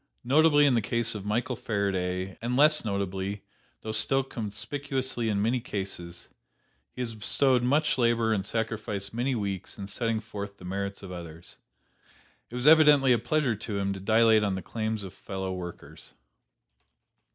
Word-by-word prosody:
Notably 145 +3 +5
in 140 - +4
the 115 - +2
case 115 +2 +1
of 105 -2 -6
Michael 120 +5 -1
Faraday, 95 -5 -2
and 120 +2 -1
less 155 +2 +5
notably, 100 -1 -3 0.4
though 110 - -5
still 135 +4 +1
conspicuously 125 +2 -3
in 100 -1 0
many 120 +3 +1
cases, 95 -6 -6 0.6
he 125 - -7
has 115 -2 -3
bestowed 125 +4 +3
much 145 +3 +2
labor 115 -2 +2
and 100 -3 -1
sacrificed 105 -2 -3
many 125 +3 0
weeks 100 -4 -4
in 100 - -6
setting 115 +2 -2
forth 100 -2 -7
the 90 - -12
merits 100 +2 -4
of 95 - -8
others. 85 -2 -9 0.9
It 120 - -9
was 125 +1 -2
evidently 150 -4 +7
a 120 - +2
pleasure 125 +1 0
to 105 0 -5
him 100 0 -1
to 95 - -7
dilate 110 +2 +4
on 100 -2 0
the 95 - -5
claims 110 -2 -3
of 95 - -8
fellow 95 -1 -5
workers. 90 -2 -9
110 Hz, 165 wpm, -28 LUFS, 100-125 Hz, 0.9 s, evidently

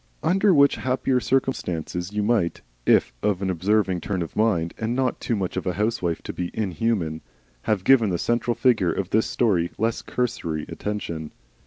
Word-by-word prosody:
Under 190 +5 +3
which 140 -4 +5
happier 130 0 0
circumstances 90 -10 -1
you 105 0 -1
might 105 -6 0 0.2
if - - +4
of 100 -2 0
an 95 - 0
observing 95 0 +1
turn 95 -2 -2
of 80 - -9
mind 95 -7 +1
and 110 +2 -1
not 130 -1 0
too 115 - -1
much 95 -3 -3
of - - -3
a 90 - +1
housewife 100 -4 -1
to - - -5
be 90 -1 -3
inhuman 95 -5 -1 0.5
have 105 -4 +1
given 115 -2 +5
the 90 - 0
central 120 +5 0
figure 110 -9 +3
of 95 +2 -3
this 110 +1 +2
story 90 -8 +1
less 115 +2 0
cursory 85 -11 -2
attention. 85 -7 -4
105 Hz, 175 wpm, -24 LUFS, 90-120 Hz, 0.5 s, which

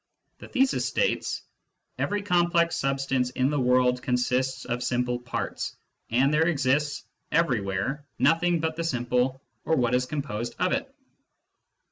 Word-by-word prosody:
The - - -10
thesis 265 +1 +1
states: - - 0 0.3
" - - -32
Every 205 0 -1
complex 175 -3 +2
substance 135 -2 0
in 130 +2 0
the 145 - 0
world 125 0 +3
consists 125 +1 0
of 120 0 -2
simple 125 0 0
parts, 120 -1 -4 0.3
and 135 +5 +3
there 160 +2 +3
exists 145 -1 +1 0.3
everywhere 125 - 0
nothing 170 +1 +3
but 160 -1 -1
the 165 - -2
simple 125 -2 0 0.2
or 160 - +2
what 125 -3 +1
is 125 0 +2
composed 125 -6 -4
of - - +1
it." - - -1
130 Hz, 140 wpm, -26 LUFS, 125-160 Hz, 0.3 s, world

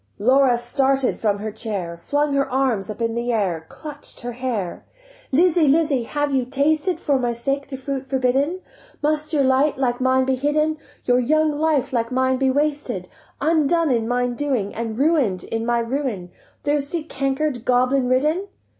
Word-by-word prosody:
Laura 255 +3 +4
started 265 +2 0
from 205 -2 +1
her 215 +1 -4
chair, 200 -6 -4
Flung 290 - -1
her 275 -1 +1
arms 250 -6 0
up 215 +2 -4
in 230 0 0
the 235 +1 -1
air, 180 -8 -1
Clutch'd 295 -2 -8
her 245 0 -4
hair: 235 -7 -3 0.5
"Lizzie, 330 +2 +4
Lizzie, 285 -4 +2
have 290 +2 -1
you 260 -1 +2
tasted 300 +6 +1
For 280 -3 +1
my 240 -1 0
sake 275 +4 -2
the 270 -1 -6
fruit 270 0 -4
forbidden? 270 +7 +1 0.4
Must 305 0 0
your 295 -3 +2
light 270 +2 +3
like 250 -2 0
mine 260 0 +3
be 265 - +1
hidden, 300 +3 0 0.3
Your 245 0 +3
young 310 +5 +2
life 295 -3 0
like 230 0 0
mine 260 0 +2
be 265 0 +2
wasted, 285 -9 -1 0.3
Undone 320 +1 +2
in 230 -2 +1
mine 245 0 0
undoing, 240 -6 -2
And 225 -1 -4
ruin'd 275 - +2
in 225 +1 -3
my 240 0 +2
ruin, 235 -6 -2 0.3
Thirsty, 295 +2 -1
canker'd, 275 -3 -2
goblin 255 +1 +2
ridden?" 305 +9 +1
265 Hz, 170 wpm, -22 LUFS, 240-290 Hz, 0.5 s, Laura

